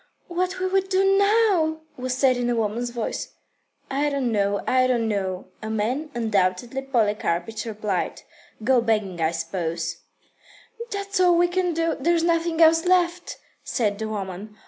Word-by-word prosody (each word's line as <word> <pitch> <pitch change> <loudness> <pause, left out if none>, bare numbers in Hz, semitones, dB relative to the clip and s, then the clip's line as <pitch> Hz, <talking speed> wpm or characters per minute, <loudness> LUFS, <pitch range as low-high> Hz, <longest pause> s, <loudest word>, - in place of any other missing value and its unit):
"What 365 +2 -1
will 375 0 0
we 385 +1 +3
do 385 0 +2
now?" 400 -6 +3
was 255 0 -3
said 260 -1 +4
in 245 0 -1
a 240 - +1
woman's 230 +2 -1
voice. 235 -2 -4 0.6
"I 285 +2 +1
don't 275 -4 -1
know, 200 -1 0
I 255 0 +3
don't 235 -3 +1
know," 190 -3 -3
a 220 - -5
man, 235 +8 -1
undoubtedly 220 +2 0
Polikarpych, 215 -5 -1
replied. 210 -4 -3 0.4
"Go 250 +1 +4
begging, 210 -6 -1
I 160 - +3
suppose." 165 0 -3 0.9
"That's 400 -1 -3
all 355 -2 +5
we 350 +1 +4
can 360 -1 0
do. 330 0 0
There's 335 +4 +2
nothing 335 -1 +2
else 325 0 +5
left," 355 -1 +1 0.3
said 210 -4 -1
the 220 0 -3
woman. 205 0 -6
245 Hz, 155 wpm, -24 LUFS, 210-340 Hz, 0.9 s, all